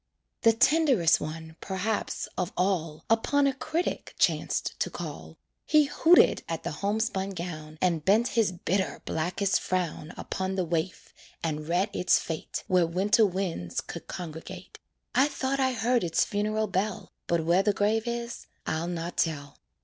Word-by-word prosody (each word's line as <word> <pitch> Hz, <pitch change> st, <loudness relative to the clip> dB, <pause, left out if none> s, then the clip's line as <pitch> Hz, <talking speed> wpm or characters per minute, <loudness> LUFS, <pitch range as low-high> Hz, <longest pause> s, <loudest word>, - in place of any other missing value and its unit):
The 230 Hz, -, +6 dB
tenderest 255 Hz, -, +4 dB
one, 160 Hz, +1 st, -6 dB
perhaps, 205 Hz, +3 st, -2 dB
of 180 Hz, +1 st, -2 dB
all, 165 Hz, -4 st, -1 dB
Upon 275 Hz, +6 st, +3 dB
a 275 Hz, -, +2 dB
critic 315 Hz, +6 st, -3 dB
chanced -, -, 0 dB
to -, -, 0 dB
call; -, -, -7 dB, 0.3 s
He 305 Hz, -1 st, +5 dB
hooted 320 Hz, +4 st, +5 dB
at -, -, -3 dB
the -, -, -3 dB
homespun 200 Hz, -1 st, -1 dB
gown, 155 Hz, -3 st, -6 dB
And 170 Hz, -4 st, +1 dB
bent 220 Hz, +7 st, +3 dB
his 225 Hz, -5 st, +2 dB
bitter, 185 Hz, +2 st, -2 dB
blackest 180 Hz, +5 st, 0 dB
frown 175 Hz, -3 st, -2 dB
Upon 190 Hz, 0 st, -3 dB
the 185 Hz, -2 st, 0 dB
waif, 170 Hz, +2 st, -3 dB, 0.3 s
and 155 Hz, -2 st, -2 dB
read 180 Hz, +5 st, +1 dB
its 180 Hz, -, +3 dB
fate 160 Hz, -2 st, -4 dB
Where 180 Hz, -3 st, +3 dB
winter 200 Hz, +5 st, +3 dB
winds 175 Hz, -, -3 dB
could -, -, -8 dB
congregate. 165 Hz, -2 st, -8 dB, 0.3 s
I 265 Hz, +3 st, +5 dB
thought 275 Hz, -1 st, -2 dB
I 260 Hz, -1 st, +2 dB
heard 240 Hz, 0 st, +1 dB
its 165 Hz, -2 st, +2 dB
funeral 215 Hz, +1 st, 0 dB
bell, 195 Hz, +1 st, -2 dB, 0.2 s
But 170 Hz, -2 st, +1 dB
where 175 Hz, +3 st, +4 dB
the 205 Hz, -, +2 dB
grave 215 Hz, +3 st, +1 dB
is 235 Hz, 0 st, -4 dB, 0.2 s
I'll 160 Hz, +2 st, -1 dB
not 175 Hz, 0 st, -4 dB
tell. 145 Hz, -3 st, -1 dB
190 Hz, 155 wpm, -28 LUFS, 165-225 Hz, 0.3 s, The